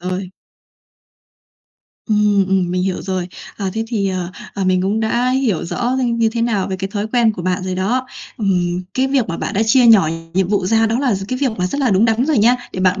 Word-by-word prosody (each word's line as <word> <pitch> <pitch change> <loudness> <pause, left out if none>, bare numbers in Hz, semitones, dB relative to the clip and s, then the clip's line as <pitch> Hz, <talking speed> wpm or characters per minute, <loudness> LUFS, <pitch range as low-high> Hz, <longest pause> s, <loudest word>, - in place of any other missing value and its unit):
rồi. 185 +1 -4 1.8
Ừm, 210 -2 +3
ừm, 185 -2 +1
mình 180 0 -1
hiểu 190 -1 -2
rồi. 185 -2 -3 0.3
À, 195 -2 -3
thế 225 0 -1
thì, 205 -5 -1
à, 185 -1 -3 0.2
à, 195 -2 -2
mình 185 0 +2
cũng 205 +3 0
đã 240 +3 +1
hiểu 255 -9 0
rõ - - -5
hơn 245 -1 0
như 225 -1 +3
thế 230 +1 -2
nào 215 -5 0
về 190 - -3
cái 195 0 -4
thói 205 +1 -3
quen 235 -3 +3
của 180 - -7
bạn 185 +1 -1
rồi 185 -1 -3
đó. 240 +8 -1 0.3
Ừm, 180 -4 0
cái 260 +1 +1
việc 265 -6 0
mà 170 - -3
bạn 210 - -4
đã 215 - +2
chia 245 +2 +5
nhỏ 205 -9 +6 0.3
nhiệm 190 -1 +1
vụ 200 -3 0
ra 225 +2 +3
đó 230 +3 0
là 260 -7 +1
gi 195 0 -4
cái 255 - -2
việc 275 -3 +1
mà 180 - +1
rất 280 - -3
là 255 -5 +2
đúng 195 +4 +3
đắn 230 +4 +2
rồi 300 -7 +2
nha. 240 +4 +4 0.2
Để 185 - -4
bạn 185 +1 +2
205 Hz, 245 wpm, -18 LUFS, 185-235 Hz, 1.8 s, nhỏ